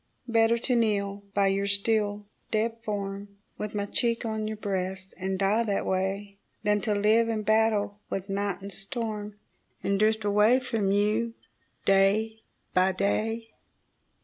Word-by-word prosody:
Better 230 Hz, 0 st, +4 dB
to 250 Hz, +2 st, 0 dB
kneel 200 Hz, -3 st, 0 dB
by 200 Hz, -1 st, +4 dB
your 195 Hz, +1 st, +1 dB
still 205 Hz, 0 st, +1 dB, 0.2 s
dead 225 Hz, +1 st, 0 dB
form, 200 Hz, -2 st, -4 dB, 0.2 s
With 210 Hz, 0 st, -4 dB
my 205 Hz, -1 st, 0 dB
cheek 230 Hz, +2 st, 0 dB
on 220 Hz, -1 st, -2 dB
your 215 Hz, 0 st, -4 dB
breast, 190 Hz, -2 st, -3 dB
and 190 Hz, 0 st, -2 dB
die 200 Hz, +4 st, +2 dB
that 200 Hz, -2 st, 0 dB
way, 195 Hz, +2 st, -2 dB, 0.2 s
Than 210 Hz, -1 st, +2 dB
to 210 Hz, -1 st, 0 dB
live 220 Hz, +3 st, +3 dB
and 215 Hz, -2 st, -2 dB
battle 215 Hz, -1 st, +2 dB
with 195 Hz, 0 st, -3 dB
night 195 Hz, -1 st, -2 dB
and 200 Hz, -, -6 dB
storm, 210 Hz, 0 st, -5 dB, 0.5 s
And 200 Hz, 0 st, +1 dB
drift 220 Hz, 0 st, +2 dB
away 210 Hz, +5 st, +5 dB
from 225 Hz, -6 st, -1 dB
you 215 Hz, +3 st, +1 dB, 0.5 s
day 205 Hz, +3 st, +3 dB, 0.3 s
by 185 Hz, +1 st, +3 dB
day. 225 Hz, +4 st, -1 dB
205 Hz, 150 wpm, -28 LUFS, 200-220 Hz, 0.5 s, away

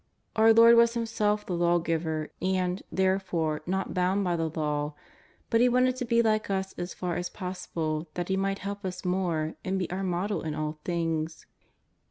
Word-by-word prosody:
Our 225 Hz, 0 st, +6 dB
Lord 230 Hz, +1 st, +8 dB
was 235 Hz, 0 st, +5 dB
Himself 215 Hz, -2 st, 0 dB
the 180 Hz, -, -3 dB
Lawgiver, 165 Hz, -2 st, 0 dB
and, 185 Hz, 0 st, 0 dB
therefore, 185 Hz, -5 st, 0 dB
not 190 Hz, +1 st, -1 dB
bound 185 Hz, +2 st, +1 dB
by 175 Hz, -2 st, +1 dB
the 165 Hz, -1 st, -1 dB
Law; 150 Hz, -1 st, -2 dB, 0.6 s
but 230 Hz, -, +4 dB
He 250 Hz, -, +5 dB
wanted 255 Hz, +1 st, +3 dB
to 250 Hz, -, -2 dB
be 235 Hz, 0 st, +3 dB
like 215 Hz, -2 st, +1 dB
us 190 Hz, -1 st, -1 dB
as 175 Hz, +1 st, -6 dB
far 175 Hz, -2 st, -2 dB
as 175 Hz, 0 st, -3 dB
possible 170 Hz, -4 st, -4 dB
that 175 Hz, -1 st, -2 dB
He 190 Hz, -, +2 dB
might 195 Hz, 0 st, 0 dB
help 200 Hz, 0 st, -4 dB
us 185 Hz, 0 st, -5 dB
more 175 Hz, -4 st, 0 dB
and 190 Hz, 0 st, -1 dB
be 185 Hz, -3 st, -1 dB
our 185 Hz, +2 st, -2 dB
Model 190 Hz, +2 st, -1 dB
in 155 Hz, -1 st, -3 dB
all 155 Hz, 0 st, -3 dB
things. 165 Hz, -2 st, -2 dB
180 Hz, 185 wpm, -28 LUFS, 165-200 Hz, 0.6 s, Lord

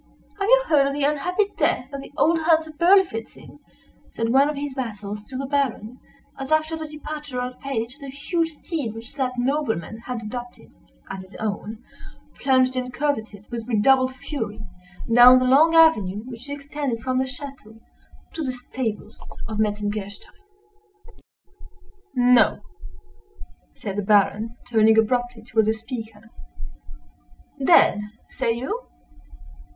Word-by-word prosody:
"Have 395 Hz, +2 st, 0 dB
you -, -, +6 dB
heard 285 Hz, -3 st, +4 dB
of 275 Hz, -, -2 dB
the 290 Hz, 0 st, -2 dB
unhappy 360 Hz, +8 st, +1 dB
death 255 Hz, +3 st, 0 dB
of 275 Hz, -, -4 dB
the -, -, -12 dB
old 325 Hz, +2 st, +3 dB
hunter 320 Hz, -1 st, +2 dB
Berlifitzing?" 340 Hz, -, +1 dB, 0.5 s
said 230 Hz, 0 st, -2 dB
one 270 Hz, +4 st, +4 dB
of 300 Hz, -, -3 dB
his 285 Hz, -1 st, -4 dB
vassals 210 Hz, -5 st, -5 dB
to 260 Hz, -, -6 dB
the 275 Hz, -, -3 dB
Baron, 260 Hz, -4 st, -2 dB, 0.4 s
as, 270 Hz, +2 st, -6 dB
after 310 Hz, +1 st, +2 dB
the 315 Hz, -1 st, -6 dB
departure 300 Hz, -3 st, -6 dB
of 250 Hz, 0 st, -3 dB
the -, -, -26 dB
page, 255 Hz, 0 st, -4 dB
the 280 Hz, -, -9 dB
huge 325 Hz, +5 st, -2 dB
steed 295 Hz, -8 st, -4 dB
which 225 Hz, +3 st, -10 dB
that 260 Hz, -3 st, -1 dB
nobleman 245 Hz, -, -1 dB
had 235 Hz, -1 st, -6 dB
adopted 245 Hz, +3 st, -8 dB, 0.4 s
as 195 Hz, -, -6 dB
his 185 Hz, +2 st, -15 dB
own, 215 Hz, +2 st, -5 dB, 0.6 s
plunged 260 Hz, -1 st, +3 dB
and 250 Hz, 0 st, -3 dB
curvetted, 220 Hz, -7 st, -3 dB
with 230 Hz, -1 st, -5 dB
redoubled 255 Hz, +3 st, +3 dB
fury, 250 Hz, -6 st, -5 dB, 0.5 s
down 245 Hz, +2 st, +9 dB
the 255 Hz, -, +2 dB
long 305 Hz, +6 st, +5 dB
avenue 215 Hz, -, +4 dB
which 250 Hz, +2 st, -9 dB
extended 285 Hz, -4 st, -4 dB
from 255 Hz, 0 st, 0 dB
the 260 Hz, -, +1 dB
château 255 Hz, -4 st, -9 dB, 0.5 s
to 325 Hz, -, -4 dB
the 260 Hz, -, -1 dB
stables 245 Hz, -3 st, -5 dB, 0.3 s
of 215 Hz, -1 st, -5 dB
Metzengerstein. 205 Hz, -1 st, -3 dB, 1.8 s
"No!" 245 Hz, -2 st, +4 dB, 1.1 s
said 200 Hz, -1 st, -6 dB
the -, -, +1 dB
Baron, 210 Hz, +3 st, +2 dB
turning 220 Hz, -2 st, +4 dB
abruptly 245 Hz, +1 st, +1 dB
toward 220 Hz, -1 st, +1 dB
the 220 Hz, -, +3 dB
speaker, 225 Hz, -1 st, -8 dB, 1.3 s
"dead! 265 Hz, -9 st, +5 dB, 0.3 s
say 230 Hz, -, 0 dB
you?" 270 Hz, -, -4 dB
255 Hz, 140 wpm, -23 LUFS, 220-285 Hz, 1.8 s, down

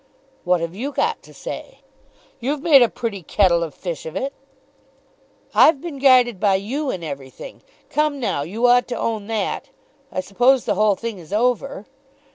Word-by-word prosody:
"What 180 Hz, -1 st, +2 dB
have 170 Hz, 0 st, -3 dB
you 255 Hz, +9 st, -4 dB
got 455 Hz, +10 st, -1 dB
to -, -, -17 dB
say?" -, -, -8 dB, 0.6 s
"You've 280 Hz, +4 st, -2 dB
made 300 Hz, -6 st, +7 dB
a 240 Hz, -, +5 dB
pretty 225 Hz, -5 st, -4 dB
kettle 170 Hz, 0 st, +2 dB
of 160 Hz, -4 st, -4 dB
fish 170 Hz, -4 st, -5 dB
of 160 Hz, -, -8 dB
it." 270 Hz, +8 st, -2 dB, 1.2 s
"I've 305 Hz, -3 st, +6 dB
been 305 Hz, -3 st, -7 dB
guided 250 Hz, -6 st, +5 dB
by 200 Hz, -1 st, +3 dB
you 260 Hz, +10 st, -2 dB
in 185 Hz, -8 st, -4 dB
everything. 140 Hz, -, -8 dB, 0.3 s
Come, 300 Hz, -1 st, +1 dB
now; 225 Hz, -, -1 dB
you 205 Hz, +11 st, -2 dB
ought 245 Hz, 0 st, +5 dB
to 245 Hz, -, -4 dB
own 220 Hz, -3 st, -2 dB
that. 225 Hz, +5 st, -2 dB, 0.4 s
I 185 Hz, -, -2 dB
suppose 245 Hz, +7 st, +2 dB
the -, -, +1 dB
whole 210 Hz, -1 st, +3 dB
thing 230 Hz, -1 st, -6 dB
is 170 Hz, 0 st, -14 dB
over?" 245 Hz, +1 st, 0 dB
230 Hz, 175 wpm, -21 LUFS, 185-270 Hz, 1.2 s, made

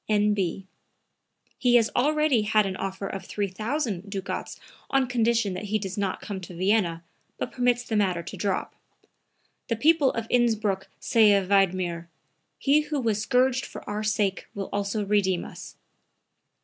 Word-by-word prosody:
N.B. 205 Hz, -3 st, +1 dB, 0.9 s
He 245 Hz, -2 st, +4 dB
has 230 Hz, -2 st, +4 dB
already 300 Hz, -2 st, +3 dB
had 215 Hz, 0 st, +3 dB
an 190 Hz, -1 st, -3 dB
offer 195 Hz, +1 st, -4 dB
of 195 Hz, 0 st, -5 dB
3,000 210 Hz, -, -2 dB
ducats 195 Hz, -1 st, -5 dB, 0.3 s
on 270 Hz, -1 st, +3 dB
condition 230 Hz, -4 st, +1 dB
that 185 Hz, +3 st, -5 dB
he 210 Hz, +1 st, 0 dB
does 195 Hz, -2 st, -5 dB
not 200 Hz, -2 st, -2 dB
come 195 Hz, -2 st, -5 dB
to 180 Hz, -1 st, -9 dB
Vienna, 180 Hz, -2 st, +1 dB, 0.3 s
but -, -, -4 dB
permits 245 Hz, -1 st, +1 dB
the 235 Hz, -2 st, -3 dB
matter 185 Hz, -5 st, +1 dB
to 170 Hz, -, -8 dB
drop. 200 Hz, -2 st, -2 dB, 0.9 s
The 230 Hz, -, 0 dB
people 295 Hz, +3 st, +4 dB
of 230 Hz, -, -3 dB
Innsbruck 220 Hz, -5 st, +1 dB
say 220 Hz, -3 st, +5 dB
of 195 Hz, -2 st, 0 dB
Wiedmer: 185 Hz, -4 st, +1 dB, 0.5 s
he 290 Hz, +2 st, +3 dB
who 300 Hz, -1 st, -3 dB
was 220 Hz, -4 st, 0 dB
scourged 255 Hz, +2 st, +2 dB
for -, -, -10 dB
our 210 Hz, +1 st, -3 dB
sake 210 Hz, -2 st, 0 dB
will 195 Hz, -1 st, -4 dB
also 205 Hz, +1 st, -1 dB
redeem 195 Hz, -3 st, +1 dB
us." -, -, -10 dB
210 Hz, 155 wpm, -26 LUFS, 195-240 Hz, 0.9 s, say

